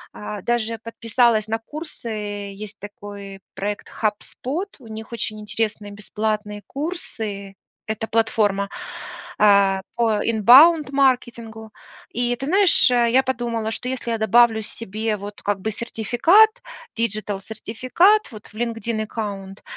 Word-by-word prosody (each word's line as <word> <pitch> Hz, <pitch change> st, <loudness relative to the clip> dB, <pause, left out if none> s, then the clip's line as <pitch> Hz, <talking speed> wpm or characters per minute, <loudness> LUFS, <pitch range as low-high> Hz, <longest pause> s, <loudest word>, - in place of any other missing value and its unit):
э, 210 Hz, -1 st, -6 dB
даже 230 Hz, -1 st, -1 dB
подписалась 230 Hz, -1 st, +1 dB
на 225 Hz, +1 st, -1 dB
курсы, 300 Hz, +2 st, -9 dB
э, 205 Hz, -2 st, -5 dB
есть 210 Hz, 0 st, -10 dB
такой 200 Hz, -1 st, -9 dB
проект 205 Hz, +1 st, -4 dB, 0.2 s
HubSpot, 255 Hz, -, -2 dB
у 245 Hz, -, -14 dB
них 220 Hz, +1 st, -8 dB
очень 215 Hz, -2 st, -4 dB
интересные 210 Hz, -1 st, -3 dB
бесплатные 210 Hz, 0 st, -3 dB
курсы. 220 Hz, -, -5 dB, 0.3 s
Это 220 Hz, +1 st, -3 dB
платформа, 215 Hz, -3 st, +1 dB, 0.7 s
э, 200 Hz, -2 st, +5 dB
по 235 Hz, -1 st, +2 dB
inbound 270 Hz, +8 st, +6 dB
маркетингу 235 Hz, -5 st, 0 dB, 0.5 s
и 245 Hz, 0 st, +1 dB
ты 270 Hz, -, -5 dB
знаешь, 375 Hz, -5 st, +5 dB
э, 240 Hz, -1 st, +3 dB
я 260 Hz, +2 st, +4 dB
подумала, 235 Hz, -4 st, -2 dB
что 250 Hz, +2 st, -4 dB
если 255 Hz, -2 st, -3 dB
я 230 Hz, -, 0 dB
добавлю 225 Hz, 0 st, +4 dB
себе 215 Hz, 0 st, -4 dB
вот 205 Hz, +1 st, -9 dB
как 205 Hz, -1 st, 0 dB
бы 220 Hz, -, -2 dB
сертификат, 240 Hz, -, +4 dB, 0.5 s
digital 210 Hz, -3 st, -2 dB
сертификат 255 Hz, -, +1 dB
вот 215 Hz, -2 st, -11 dB
в -, -, -19 dB
Linkedin 230 Hz, -1 st, -2 dB
аккаунт, 200 Hz, -3 st, -6 dB
220 Hz, 130 wpm, -22 LUFS, 210-240 Hz, 0.7 s, inbound